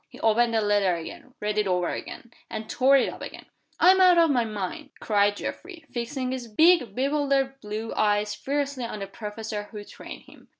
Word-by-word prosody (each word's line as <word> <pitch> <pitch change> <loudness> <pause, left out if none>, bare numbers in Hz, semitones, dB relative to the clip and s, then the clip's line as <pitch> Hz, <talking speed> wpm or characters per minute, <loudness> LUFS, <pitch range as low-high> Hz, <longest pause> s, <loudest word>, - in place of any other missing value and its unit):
He - - -14
opened 230 +1 +3
the 220 - +3
letter 205 -3 +2
again, 170 +9 -9
read 210 0 -1
it 210 - +1
over 180 -1 0
again, 235 - -7 0.2
and 215 0 -6
tore 265 +4 +4
it - - +2
up - - -7
again. - - -8 0.3
"I'm 375 +1 +6
out 365 -2 +6
of 330 -2 +5
my 245 -3 +2
mind!" 205 -4 -5
cried 205 -1 +2
Geoffrey, 340 -2 -7
fixing 255 +2 -3
his 255 -2 -5
big 270 - +4
bewildered 275 0 0
blue 215 +2 -5
eyes 210 0 +1
fiercely 280 +1 -3
on 230 - -5
the 200 - -5
professor 210 +1 -6
who 210 -2 -8
trained - - -11
him. - - -19
230 Hz, 195 wpm, -26 LUFS, 210-275 Hz, 0.3 s, I'm